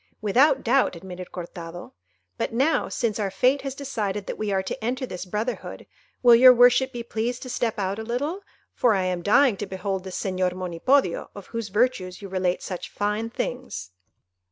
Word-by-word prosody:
"Without 240 Hz, +8 st, +3 dB
doubt," 255 Hz, -4 st, +2 dB
admitted 180 Hz, +1 st, -9 dB
Cortado; 175 Hz, -1 st, -8 dB, 0.4 s
"but -, -, -2 dB
now, 270 Hz, +8 st, +1 dB
since 225 Hz, -3 st, -1 dB
our 200 Hz, -2 st, 0 dB
fate 255 Hz, +9 st, +2 dB
has 270 Hz, -1 st, -5 dB
decided 210 Hz, -8 st, -3 dB
that -, -, -4 dB
we 215 Hz, -1 st, -1 dB
are 190 Hz, -1 st, +1 dB
to 190 Hz, -, -5 dB
enter 255 Hz, +3 st, -1 dB
this 185 Hz, -5 st, -6 dB
brotherhood, 215 Hz, +6 st, -4 dB, 0.4 s
will 240 Hz, -1 st, +8 dB
your 255 Hz, +2 st, +9 dB
worship 245 Hz, +2 st, +5 dB
be 240 Hz, -2 st, -5 dB
pleased 235 Hz, +2 st, -3 dB
to 255 Hz, -, -6 dB
step 230 Hz, -3 st, -1 dB
out 195 Hz, +1 st, -2 dB
a -, -, -4 dB
little, 285 Hz, -, -2 dB, 0.3 s
for 235 Hz, -4 st, +3 dB
I 190 Hz, -, +1 dB
am 180 Hz, -1 st, -1 dB
dying 230 Hz, +3 st, +4 dB
to 205 Hz, -, -4 dB
behold 190 Hz, 0 st, -3 dB
this 190 Hz, -1 st, -5 dB
Señor 185 Hz, -2 st, 0 dB
Monipodio, 185 Hz, +5 st, +1 dB
of 200 Hz, -2 st, -9 dB
whose 230 Hz, -3 st, -3 dB
virtues 205 Hz, -4 st, 0 dB
you 200 Hz, -, -8 dB
relate 185 Hz, -1 st, -1 dB
such 180 Hz, -2 st, -5 dB
fine 210 Hz, +2 st, -2 dB
things." 245 Hz, -, -5 dB
210 Hz, 185 wpm, -25 LUFS, 185-250 Hz, 0.4 s, your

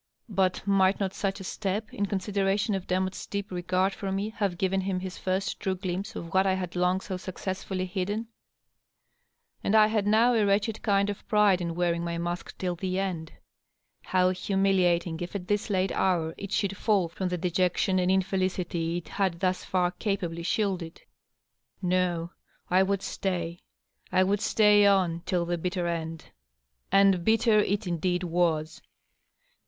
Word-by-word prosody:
But 190 Hz, -3 st, 0 dB
might 195 Hz, -1 st, +3 dB
not 195 Hz, -2 st, -1 dB
such 195 Hz, 0 st, -2 dB
a -, -, -7 dB
step, 205 Hz, +3 st, -3 dB
in 200 Hz, -, -1 dB
con 200 Hz, -, -1 dB
sideration 200 Hz, +2 st, 0 dB
of 190 Hz, -1 st, -5 dB
Demotte's 185 Hz, +1 st, -1 dB
deep 200 Hz, -1 st, -4 dB
regard 185 Hz, +2 st, 0 dB
for 195 Hz, -1 st, -4 dB
me, 195 Hz, +2 st, -1 dB
have 200 Hz, -5 st, -2 dB
given 190 Hz, +1 st, +1 dB
him 190 Hz, -1 st, -1 dB
his 185 Hz, 0 st, -6 dB
first 190 Hz, +1 st, -1 dB
true 190 Hz, -1 st, -1 dB
glimpse 190 Hz, +4 st, -4 dB
of 165 Hz, -1 st, -7 dB
what 190 Hz, +1 st, +4 dB
I 190 Hz, -, +2 dB
had 185 Hz, -2 st, -4 dB
long 180 Hz, +1 st, +1 dB
so 185 Hz, -, -4 dB
successfully 185 Hz, 0 st, -4 dB
hidden? 200 Hz, +5 st, -3 dB, 1.4 s
And 210 Hz, -, +1 dB
I 215 Hz, -1 st, +8 dB
had 215 Hz, -2 st, 0 dB
now 225 Hz, +4 st, +4 dB
a 225 Hz, -2 st, +3 dB
wretched 205 Hz, +2 st, +1 dB
kind 200 Hz, -1 st, +2 dB
of 205 Hz, -, -10 dB
pride 210 Hz, -4 st, +4 dB
in 170 Hz, -1 st, -3 dB
wearing 170 Hz, -1 st, 0 dB
my 170 Hz, 0 st, -2 dB
mask 175 Hz, +1 st, -4 dB
till 180 Hz, -2 st, -2 dB
the 185 Hz, +1 st, -2 dB
end. 180 Hz, -5 st, -3 dB, 0.7 s
How 185 Hz, 0 st, +3 dB
humiliating 185 Hz, -3 st, +1 dB
if 175 Hz, +3 st, -6 dB
at 180 Hz, -2 st, -4 dB
this 205 Hz, +1 st, 0 dB
late 190 Hz, -1 st, +1 dB
hour 170 Hz, -4 st, +1 dB
it 200 Hz, -, -7 dB
should 200 Hz, -2 st, +1 dB
&1II 195 Hz, -4 st, +1 dB
from 185 Hz, +2 st, -3 dB
the 180 Hz, -, -1 dB
dejection 180 Hz, +2 st, +1 dB
and 180 Hz, 0 st, +1 dB
in 190 Hz, 0 st, +3 dB
felicity 180 Hz, -3 st, -1 dB
it 175 Hz, -, -7 dB
had 190 Hz, -4 st, -1 dB
thus 185 Hz, 0 st, 0 dB
fiur 180 Hz, -1 st, 0 dB
capably 180 Hz, -5 st, -2 dB
shielded! 180 Hz, -2 st, -2 dB, 0.8 s
No, 175 Hz, -2 st, 0 dB, 0.4 s
I 185 Hz, +1 st, +5 dB
would 195 Hz, 0 st, 0 dB
stay; 175 Hz, -3 st, -3 dB, 0.5 s
I 185 Hz, 0 st, +4 dB
would 200 Hz, +2 st, +1 dB
stay 210 Hz, -1 st, +5 dB
on, 180 Hz, -4 st, +2 dB
till 175 Hz, -2 st, +1 dB
the 175 Hz, 0 st, -2 dB
bitter 180 Hz, +1 st, -2 dB
end. 165 Hz, -1 st, -4 dB, 0.6 s
And 195 Hz, -3 st, +5 dB
bitter 220 Hz, +1 st, +4 dB
it 205 Hz, 0 st, 0 dB
indeed 180 Hz, +1 st, -1 dB
was 165 Hz, -3 st, 0 dB
185 Hz, 170 wpm, -28 LUFS, 175-200 Hz, 1.4 s, I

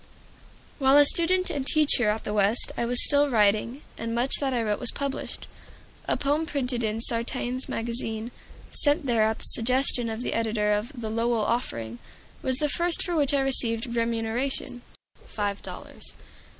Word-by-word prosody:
While 270 Hz, 0 st, +4 dB
a 290 Hz, -, +7 dB
student 360 Hz, +4 st, +3 dB
and 285 Hz, -4 st, -3 dB
teacher 280 Hz, -6 st, +3 dB
at 215 Hz, +1 st, -2 dB
the 210 Hz, -, -4 dB
West 210 Hz, +3 st, +1 dB
I 235 Hz, -, -2 dB
was 245 Hz, +1 st, +7 dB
still 285 Hz, 0 st, +4 dB
writing, 220 Hz, +4 st, 0 dB, 0.2 s
and 230 Hz, 0 st, -4 dB
much 245 Hz, +3 st, -1 dB
that 275 Hz, -2 st, -2 dB
I 240 Hz, -3 st, -1 dB
wrote 210 Hz, -1 st, -2 dB
was 245 Hz, -, +4 dB
published. 280 Hz, -1 st, -5 dB, 0.6 s
A -, -, 0 dB
poem 295 Hz, +3 st, -1 dB
printed 250 Hz, -5 st, -2 dB
in 220 Hz, +1 st, -2 dB
"Sartain's 245 Hz, +2 st, -1 dB
Magazine," 225 Hz, 0 st, -4 dB, 0.4 s
sent 290 Hz, +1 st, +2 dB
there 235 Hz, -4 st, +1 dB
at 220 Hz, 0 st, -1 dB
the -, -, -10 dB
suggestion 250 Hz, 0 st, +3 dB
of 225 Hz, +2 st, -5 dB
the -, -, -3 dB
editor 220 Hz, -2 st, -1 dB
of 210 Hz, +6 st, -3 dB
the 220 Hz, -2 st, -5 dB
"Lowell 230 Hz, -1 st, -1 dB
Offering" 115 Hz, -, -3 dB, 0.4 s
was 260 Hz, -1 st, -1 dB
the 300 Hz, -, 0 dB
first 340 Hz, +3 st, 0 dB
for 350 Hz, -2 st, -3 dB
which 290 Hz, -2 st, +1 dB
I 275 Hz, -, +1 dB
received 235 Hz, -3 st, +1 dB
remuneration 235 Hz, +3 st, -3 dB, 0.5 s
five 205 Hz, -1 st, -4 dB
dollars. -, -, -10 dB
240 Hz, 170 wpm, -25 LUFS, 225-275 Hz, 0.6 s, a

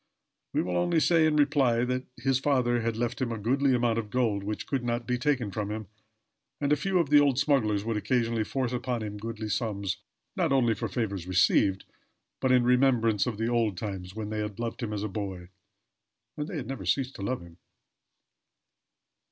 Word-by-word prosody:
We -, -, +1 dB
will 90 Hz, 0 st, -1 dB
only 90 Hz, -, +2 dB
say 160 Hz, 0 st, +4 dB
in 155 Hz, -, +1 dB
reply, 135 Hz, -5 st, +3 dB, 0.3 s
his 130 Hz, +1 st, +1 dB
father 125 Hz, -4 st, +2 dB
had 115 Hz, -1 st, -1 dB
left 120 Hz, +2 st, -2 dB
him 125 Hz, -2 st, 0 dB
a 115 Hz, -, -3 dB
goodly 130 Hz, +5 st, +2 dB
amount 120 Hz, -2 st, +1 dB
of 110 Hz, -2 st, -5 dB
gold 110 Hz, -4 st, 0 dB
which 105 Hz, +1 st, -4 dB
could 135 Hz, -3 st, -2 dB
not 120 Hz, 0 st, -1 dB
be 125 Hz, -1 st, -1 dB
taken 125 Hz, -5 st, 0 dB
from 105 Hz, 0 st, -3 dB
him, 110 Hz, 0 st, -4 dB, 0.7 s
and 145 Hz, 0 st, +2 dB
a -, -, +5 dB
few 185 Hz, +6 st, 0 dB
of 165 Hz, -5 st, +1 dB
the 145 Hz, -, +8 dB
old 140 Hz, -3 st, +3 dB
smugglers 110 Hz, -8 st, +2 dB
would 115 Hz, -1 st, -1 dB
occasionally 115 Hz, 0 st, 0 dB
force 130 Hz, +2 st, -2 dB
upon 125 Hz, -2 st, -2 dB
him 105 Hz, -1 st, -5 dB
goodly 110 Hz, 0 st, -5 dB
sums, 100 Hz, -4 st, -2 dB, 0.4 s
not 175 Hz, -7 st, +1 dB
only 125 Hz, -4 st, +3 dB
for 105 Hz, -, -3 dB
favors 100 Hz, -7 st, -3 dB
received, 95 Hz, +2 st, +3 dB, 0.5 s
but 130 Hz, -, +1 dB
in 125 Hz, -1 st, +5 dB
remembrance 125 Hz, -4 st, +3 dB
of 115 Hz, -4 st, -2 dB
the 115 Hz, +1 st, -1 dB
old 115 Hz, -5 st, +1 dB
times, 95 Hz, -2 st, -5 dB
when 110 Hz, -1 st, -5 dB
they 110 Hz, -, -2 dB
had 105 Hz, -2 st, -4 dB
loved 115 Hz, +2 st, -4 dB
him 115 Hz, -3 st, -3 dB
as 105 Hz, -1 st, -3 dB
a -, -, -1 dB
boy. 95 Hz, -3 st, -5 dB, 0.9 s
And 150 Hz, 0 st, -4 dB
they 185 Hz, -, -6 dB
had 135 Hz, -, -4 dB
never 135 Hz, -7 st, -5 dB
ceased 130 Hz, +9 st, 0 dB
to -, -, -8 dB
love 120 Hz, +1 st, -2 dB
him. 85 Hz, 0 st, -15 dB
115 Hz, 200 wpm, -28 LUFS, 105-130 Hz, 0.9 s, the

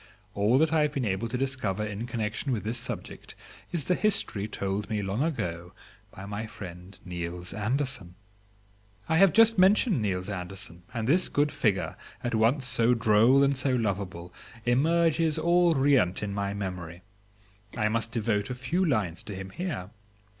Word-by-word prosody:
All 105 Hz, +5 st, +3 dB
that 160 Hz, +2 st, +3 dB
I 160 Hz, -, +4 dB
have 150 Hz, -1 st, +1 dB
been 135 Hz, -4 st, -1 dB
able 100 Hz, +3 st, -1 dB
to 125 Hz, -, -2 dB
discover 125 Hz, -6 st, -1 dB
in 105 Hz, +3 st, -5 dB
connection 115 Hz, +3 st, -2 dB
with 115 Hz, -4 st, -1 dB
this 115 Hz, +3 st, -1 dB
subject 125 Hz, -, -7 dB, 0.4 s
is 170 Hz, -5 st, -2 dB
the 180 Hz, -, +2 dB
history 175 Hz, -, 0 dB
told 100 Hz, -1 st, -3 dB
me 105 Hz, -2 st, -1 dB
long 100 Hz, +5 st, -2 dB
ago 90 Hz, -, -3 dB, 0.4 s
by 95 Hz, -, -10 dB
my 105 Hz, +2 st, -5 dB
friend 90 Hz, -3 st, -10 dB
Niels 90 Hz, 0 st, -5 dB
Andersen. 110 Hz, -4 st, -2 dB, 0.9 s
I 160 Hz, -, +2 dB
have 195 Hz, -2 st, +7 dB
just 225 Hz, -2 st, +5 dB
mentioned 195 Hz, -, +4 dB
Niels 95 Hz, -3 st, -1 dB
Andersen, 90 Hz, -2 st, -5 dB
and 115 Hz, -2 st, -3 dB
this 175 Hz, +7 st, +3 dB
good 145 Hz, +1 st, +1 dB
figure, 100 Hz, -5 st, 0 dB, 0.3 s
at 120 Hz, -, -2 dB
once 115 Hz, +5 st, +2 dB
so 120 Hz, -1 st, +2 dB
droll 115 Hz, +4 st, +5 dB
and 140 Hz, 0 st, +3 dB
so 130 Hz, 0 st, 0 dB
lovable, 95 Hz, -6 st, -3 dB, 0.3 s
emerges 160 Hz, +4 st, +2 dB
all 175 Hz, -1 st, +3 dB
riant 135 Hz, -10 st, +3 dB
in 100 Hz, -1 st, -3 dB
my 100 Hz, 0 st, -2 dB
memory. 90 Hz, -3 st, -6 dB, 0.7 s
I 105 Hz, -2 st, +2 dB
must 115 Hz, +1 st, -1 dB
devote 105 Hz, -3 st, -1 dB
a 125 Hz, -, -3 dB
few 165 Hz, +9 st, -1 dB
lines 105 Hz, -, 0 dB
to 100 Hz, -, -7 dB
him 95 Hz, 0 st, -7 dB
here. 155 Hz, -, -4 dB
110 Hz, 170 wpm, -28 LUFS, 100-140 Hz, 0.9 s, have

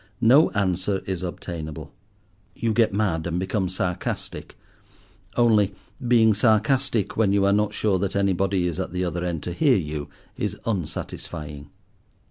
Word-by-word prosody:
No 135 Hz, +8 st, +6 dB
answer 95 Hz, 0 st, 0 dB
is 95 Hz, -2 st, -3 dB
obtainable. 85 Hz, -4 st, -6 dB, 0.6 s
You 115 Hz, -1 st, 0 dB
get 115 Hz, 0 st, +3 dB
mad, 95 Hz, -6 st, 0 dB
and 85 Hz, +1 st, -1 dB
become 95 Hz, 0 st, -1 dB
sarcastic; 90 Hz, -1 st, -4 dB, 0.8 s
only 105 Hz, -5 st, +3 dB, 0.3 s
being 115 Hz, -2 st, +5 dB
sarcastic 110 Hz, +1 st, +2 dB
when 105 Hz, -3 st, +3 dB
you 100 Hz, -1 st, +3 dB
are 100 Hz, -, +4 dB
not 105 Hz, 0 st, +1 dB
sure 100 Hz, -4 st, +1 dB
that 100 Hz, 0 st, -2 dB
anybody 95 Hz, -1 st, +1 dB
is 85 Hz, -3 st, -2 dB
at -, -, -3 dB
the 90 Hz, 0 st, -1 dB
other 85 Hz, 0 st, -2 dB
end 85 Hz, -3 st, -3 dB
to 90 Hz, -, -4 dB
hear 135 Hz, -, +4 dB
you 75 Hz, -4 st, -4 dB, 0.3 s
is -, -, -3 dB
unsatisfying. 75 Hz, -6 st, -5 dB
95 Hz, 145 wpm, -24 LUFS, 85-110 Hz, 0.8 s, No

